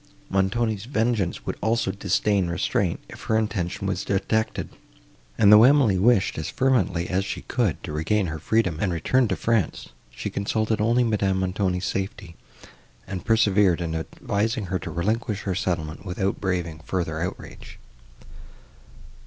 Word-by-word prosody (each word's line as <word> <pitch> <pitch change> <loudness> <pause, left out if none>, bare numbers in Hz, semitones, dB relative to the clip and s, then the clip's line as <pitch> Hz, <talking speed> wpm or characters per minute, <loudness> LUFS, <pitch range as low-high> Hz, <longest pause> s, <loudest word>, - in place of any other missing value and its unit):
—Montoni's 100 +2 0
vengeance 115 -7 -1
would - - -3
also 110 -2 +1
disdain 100 0 +1
restraint, 85 -1 0
if - - -11
her 110 - +2
intention 95 -3 -2
was 95 - -1
detected: 105 +3 -1 0.7
and, 105 -1 +7
though 105 - +9
Emily 125 -7 +5
wished, 100 -5 +3
as 80 - -4
fervently 120 -10 +1
as 95 +1 0
she - - -5
could 115 - 0
do, - - -5
to 75 - -4
regain 95 +6 +1
her 80 -2 -4
freedom, 95 -2 0
and 95 - 0
return 120 - +2
to 95 - 0
France, 115 -5 -1 0.2
she - - -6
consulted 110 +2 -1
only 120 +3 +3
Madame 100 -4 +1
Montoni's 90 0 -1
safety, 95 -3 -4 0.7
and 95 -2 -6
persevered 105 -5 +3
in 85 -2 -3
advising 105 +7 -2
her 95 - +1
to - - -7
relinquish 105 +3 -1
her 95 - -1
settlement, 85 -4 -3
without 95 0 -2
braving 90 -5 -2
further 80 -1 -3
outrage. 90 +2 -7
100 Hz, 150 wpm, -24 LUFS, 90-110 Hz, 0.7 s, though